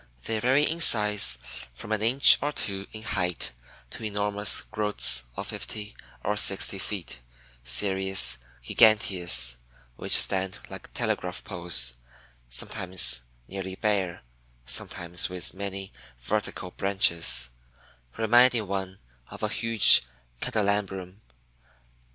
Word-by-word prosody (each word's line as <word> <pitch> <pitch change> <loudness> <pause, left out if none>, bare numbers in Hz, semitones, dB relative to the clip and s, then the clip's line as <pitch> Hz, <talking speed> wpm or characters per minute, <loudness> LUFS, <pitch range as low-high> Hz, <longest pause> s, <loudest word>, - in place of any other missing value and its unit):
They 110 -1 -3
vary 130 +6 +1
in 165 +3 0
size 105 - +5 0.4
from 105 - -11
an 110 -1 -2
inch 125 +5 +8
or 145 +2 -3
two 100 -7 -3
in 110 0 -11
height 90 -5 -3 0.4
to - - -9
enormous 105 -1 0
growths 105 - -1
of - - -6
fifty 105 -1 -8 0.3
or 105 - -2
sixty 95 -1 0
feet 95 -10 -7 0.4
(Cereus 95 +2 +1 0.2
giganteus) 90 - +2 0.4
which - - +4
stand 95 0 +1
like - - -11
telegraph 90 0 -4
poles, 85 - +5 0.6
sometimes 85 +2 -1 0.3
nearly 95 -1 -8
bare, 95 -6 -3 0.4
sometimes 85 +7 -2
with 90 -2 -2
many 95 0 -8 0.3
vertical 95 - -5
branches, 85 -11 +1 0.7
reminding 120 0 +2
one 95 -1 -6 0.3
of - - -11
a - - -2
huge 115 -2 +5 0.4
candelabrum. 100 -2 -4
95 Hz, 110 wpm, -24 LUFS, 90-105 Hz, 0.7 s, inch